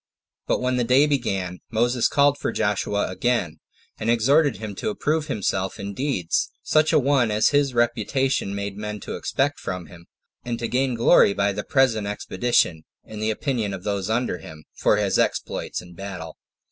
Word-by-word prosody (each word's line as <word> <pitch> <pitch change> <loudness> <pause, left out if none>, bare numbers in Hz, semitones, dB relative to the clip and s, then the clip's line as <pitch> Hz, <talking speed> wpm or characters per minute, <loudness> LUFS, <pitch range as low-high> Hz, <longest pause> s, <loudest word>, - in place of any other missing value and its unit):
But - - +1
when 125 0 0
the 125 - +2
day 130 +5 +5
began, 95 -11 -1
Moses 120 +1 +2
called 145 0 +3
for - - -1
Joshua 105 -1 0
again, 120 +5 -1 0.4
and 110 - -2
exhorted 135 +4 +3
him 110 -2 -6
to - - -2
approve 155 -6 -1
himself 95 -2 -2
in 100 0 -5
deeds 115 - -1
such 155 0 +3
a - - +4
one 135 -4 +3
as 105 +5 +2
a - - +5
his 140 -3 +1
reputation 120 -1 0
made 100 0 -4
men 105 0 -5
expect 145 +2 -1
from 90 -2 -5
him; 85 +2 -15 0.4
and 120 -1 -3
to 115 0 -3
gain 130 0 0
glory 115 -3 +5
by 100 0 +1
the 105 +1 -4
present 115 -6 +2
expedition, 105 -5 0 0.2
in 110 - -9
the 110 +1 0
opinion 110 -3 -1
of 90 - -10
those 100 -2 -2
under 115 -4 0
him, 80 -1 -11
for - - +2
his - - +1
exploits - - -1
in 90 - -14
this 85 - -16
battle. 90 -5 -7
110 Hz, 185 wpm, -23 LUFS, 100-130 Hz, 0.4 s, day